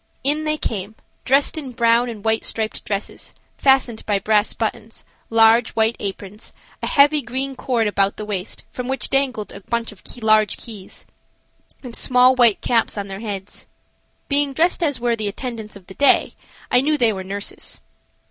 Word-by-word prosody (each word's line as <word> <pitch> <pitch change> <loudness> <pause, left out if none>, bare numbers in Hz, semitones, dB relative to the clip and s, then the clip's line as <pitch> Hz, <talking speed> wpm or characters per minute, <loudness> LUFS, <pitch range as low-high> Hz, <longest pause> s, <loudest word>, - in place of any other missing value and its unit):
In 300 +3 +1
they 305 0 0
came, 210 -5 -4 0.3
dressed 275 +4 +3
in 265 -4 -8
brown 235 +1 +3
and 220 -3 -9
white 220 0 +1
striped 220 -1 -3
dresses, 200 0 -5 0.2
fastened 265 -4 +3
by 205 -2 +2
brass 210 +1 +2
buttons, 220 0 -5 0.2
large, 225 +1 +4
white 225 +1 +2
aprons, 200 +1 -6 0.3
a - - -2
heavy 290 +1 +4
green 265 +3 -4
cord 240 -3 0
about 200 -1 +1
the 210 - -5
waist, 200 -2 -4
from 250 -1 -5
which 265 +1 -1
dangled 260 -6 0
a - - -9
bunch 230 +3 -3
of 205 - -16 0.2
large 215 -1 +4
keys, 210 -5 -9 0.8
and 245 -2 -6
small, 250 0 +4
white 240 -5 +4
caps 230 -2 +1
on 200 -1 -4
their 195 0 -6
heads. 205 -3 -6 0.6
Being 285 -1 +1
dressed 340 +6 +1
as 290 -7 +1
were 240 -1 +1
the 215 -2 -3
attendants 220 0 -6
of 195 -3 -13
the 190 - -12
day, 280 +7 +4 0.4
I 250 - +5
knew 300 +2 +1
they 235 -5 +3
were 190 -1 -5
nurses. 200 +2 -5
230 Hz, 175 wpm, -21 LUFS, 210-260 Hz, 0.8 s, I